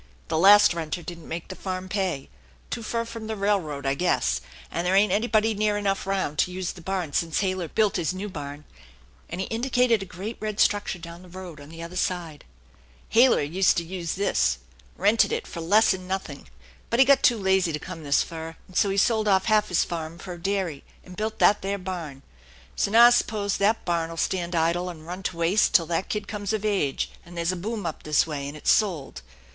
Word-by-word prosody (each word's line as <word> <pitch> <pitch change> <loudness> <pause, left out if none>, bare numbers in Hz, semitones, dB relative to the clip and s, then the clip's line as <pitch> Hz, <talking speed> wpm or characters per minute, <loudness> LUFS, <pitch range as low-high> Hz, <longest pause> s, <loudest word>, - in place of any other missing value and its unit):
The - - 0
last 205 +1 +7
renter 170 +1 -4
didn't 170 0 -9
make 165 0 -6
the 185 - -6
farm 185 -1 -5
pay, 185 -8 -2 0.4
too 235 - -3
fur 230 +1 -2
from 230 -1 -7
the 220 - -3
railroad, 190 -9 -1
I 135 - +2
guess, 175 +6 +1 0.3
and 170 +2 -2
there 185 - +2
ain't 200 0 +4
anybody 220 +1 +2
near 210 0 +1
enough 195 -2 -1
round 190 -7 -1
to 180 - +2
use 185 -1 -3
the 175 - -12
barn 180 -4 -3
since 165 +1 0
Halyer 185 -3 -1
built 210 +5 +1
his 175 -2 0
new 190 +3 -5
barn," 145 -4 -7 0.6
and 175 - -5
he 190 - -1
indicated 245 -2 +2
a 195 - -6
great 195 +6 -6
red 215 -1 -4
structure 205 -2 +2
down 170 0 -10
the 180 - -14
road 175 -4 -9
on 145 - -12
the 165 +1 -9
other 170 +2 -8
side. 175 -5 -3 0.3
" - - -29
Halyer 240 - +5
useta 170 +1 +2
use 175 -2 -3
this, 190 - +1 0.4
rented 210 +4 +3
it - - -2
fer 170 - -7
less'n 190 +1 +3
nothing, 185 - -5 0.4
but 235 - +1
he 265 - +7
got 280 +1 +5
too 240 - +4
lazy 190 -3 +2
to 150 - -2
come 165 +1 -8
this 140 -1 +3
fur, 165 0 -7
and 185 - -17
so 200 - +3
he 195 - -1
eold 215 +1 +2
off 190 -2 +3
half 215 -1 +3
his 180 - +3
farm 165 -1 -5
fer 180 +1 -7
a 175 - -11
dairy 190 -6 -2 0.2
and 180 - -12
built 215 +2 -3
that 205 - +4
there 195 +1 -2
barn. 170 -8 -6 0.5
So - - 0
now 230 +3 +8
I - - +9
s'pose 210 -4 +1
that 210 +3 +1
barn'll 165 -1 -1
stand 175 0 -1
idle 170 +2 +1
and 160 -3 -10
run 180 +3 -6
to 185 -2 -4
waste 170 +5 +2
till 165 - +6
that 170 +3 -2
kid 210 -1 -3
comes 205 -1 -3
of 215 -1 -2
age 195 -10 0
and 175 0 -12
there's 170 +1 0
a - - -3
boom 205 +2 -4
up 160 - -4
this 155 -1 +2
way 145 -3 -4
and 145 +2 -7
it's - - +2
sold. 175 - 0
185 Hz, 220 wpm, -25 LUFS, 165-205 Hz, 0.6 s, I